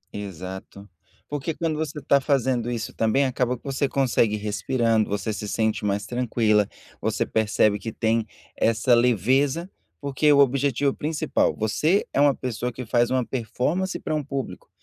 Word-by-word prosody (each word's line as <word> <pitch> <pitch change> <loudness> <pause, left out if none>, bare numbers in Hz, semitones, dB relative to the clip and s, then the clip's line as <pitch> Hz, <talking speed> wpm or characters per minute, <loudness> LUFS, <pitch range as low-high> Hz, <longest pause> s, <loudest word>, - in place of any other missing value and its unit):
Exato, 95 0 -8 0.4
porque 145 +2 -3
quando 165 -2 -1
você 150 -1 -3
está 140 -1 +2
fazendo 130 -3 +1
isso 120 -2 -4
também 115 +5 +2
acaba 125 -1 0
que - - -28
você 140 0 -1
consegue 120 -6 +2
respirando, 110 +2 0
você 105 +2 -2
se 105 0 -5
sente 110 0 0
mais 100 0 -1
tranquila, 110 -3 +1 0.3
você - - 0
percebe 105 -1 +2
que 115 - -5
tem 115 0 0 0.3
essa 115 +2 +2
leveza, 130 - +2 0.3
porque 140 +1 +2
o 145 - +5
objetivo 140 0 +2
principal, 155 +1 0
você 155 - +1
é 140 - +2
uma 145 -2 +5
pessoa 125 0 -3
que 125 +1 -7
faz 120 +1 +2
uma 130 -1 +1
performance 130 - -2
para - - -3
um 150 -1 -1
público. 135 -2 -6
125 Hz, 160 wpm, -24 LUFS, 110-140 Hz, 0.4 s, o